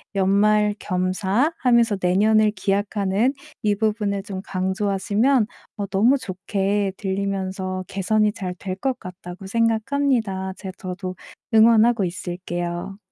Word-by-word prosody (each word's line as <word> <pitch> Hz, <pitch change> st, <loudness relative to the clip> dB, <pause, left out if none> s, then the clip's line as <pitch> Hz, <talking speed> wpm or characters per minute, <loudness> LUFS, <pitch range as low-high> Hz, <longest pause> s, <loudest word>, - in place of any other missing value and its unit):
연말 205 Hz, +2 st, +3 dB
겸사 190 Hz, -, 0 dB
하면서 235 Hz, -4 st, +3 dB
내년을 210 Hz, +4 st, +4 dB
기약하는 200 Hz, +3 st, 0 dB, 0.3 s
이 210 Hz, -1 st, +2 dB
부분을 210 Hz, -2 st, -1 dB
좀 190 Hz, -2 st, -6 dB
강조하시면 200 Hz, +6 st, +1 dB, 0.3 s
어 205 Hz, -, -2 dB
너무 210 Hz, +8 st, +3 dB
좋게 195 Hz, -1 st, -1 dB
들리면서 190 Hz, -1 st, -2 dB
개선이 210 Hz, +2 st, +1 dB
잘 185 Hz, -4 st, -5 dB
될 185 Hz, 0 st, -5 dB
것 260 Hz, +5 st, -1 dB
같다고 180 Hz, +1 st, -9 dB
생각합니다. 225 Hz, -2 st, 0 dB
제 190 Hz, -, -6 dB
저도 185 Hz, 0 st, -5 dB, 0.4 s
응원하고 225 Hz, -1 st, +5 dB
있을게요. 175 Hz, +1 st, -4 dB
200 Hz, 265 characters per minute, -23 LUFS, 190-215 Hz, 0.4 s, 응원하고